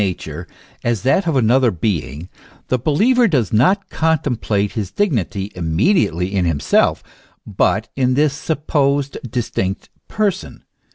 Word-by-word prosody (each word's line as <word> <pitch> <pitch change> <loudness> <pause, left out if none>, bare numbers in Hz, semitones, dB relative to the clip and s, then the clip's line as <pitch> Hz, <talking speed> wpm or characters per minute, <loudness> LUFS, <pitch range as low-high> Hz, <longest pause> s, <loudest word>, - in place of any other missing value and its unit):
nature 85 -4 -4 0.4
as 120 -5 -1
that 155 +8 +2
of 160 - +1
another 125 +1 +3
being, 85 -5 -3 0.4
the 130 - +1
believer 230 - +3
does 130 - 0
not 185 - +3
con 160 0 +2
template 110 -8 -1
his 105 -5 -4
dignity 105 - -1
immediately 90 - 0
in 95 -2 +1
himself, 75 -3 +1 0.4
but - - 0
in 130 -1 +1
this 145 0 +2
sup 150 0 -4
posed 140 -1 +1
distinct 100 -5 -3 0.2
person. 205 -3 -2
120 Hz, 130 wpm, -18 LUFS, 95-150 Hz, 0.4 s, another